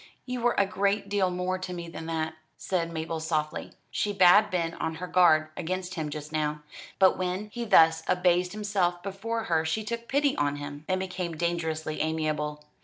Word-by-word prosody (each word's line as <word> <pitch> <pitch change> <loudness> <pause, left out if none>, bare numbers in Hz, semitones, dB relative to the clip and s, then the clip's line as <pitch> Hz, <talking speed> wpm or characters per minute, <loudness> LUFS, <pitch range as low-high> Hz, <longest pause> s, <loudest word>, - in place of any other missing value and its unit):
"You 250 -1 -4
were 240 0 +2
a 200 - +4
great 200 +1 0
deal 200 -2 +2
more 180 +1 -2
to 185 0 -5
me 170 -1 -6
than 165 -1 -7
that," 160 -1 -2 0.2
said 170 -3 -1
Mabel 160 0 -3
softly. 155 -1 -2 0.2
She 205 - -1
bad 200 +2 +6
been 170 -3 -1
on 160 -1 -3
her 180 +3 -5
guard 165 -4 +4
against 180 +1 -3
him 160 -4 -3
just 150 +1 -7
now, 150 -1 -1 0.3
but 190 -1 +4
when 185 +3 -2
he 240 -1 -3
thus 165 -6 +6
abased 180 0 +2
himself 195 -4 0
before 220 +4 -3
her 165 -6 +1
she 160 +7 -1
took 235 +2 -5
pity 285 0 +2
upon 145 0 0
him, 145 +1 -7
and 185 0 +1
became 185 -3 -4
dangerously 160 -2 -2
amiable. 155 -1 -1
175 Hz, 185 wpm, -28 LUFS, 160-195 Hz, 0.3 s, bad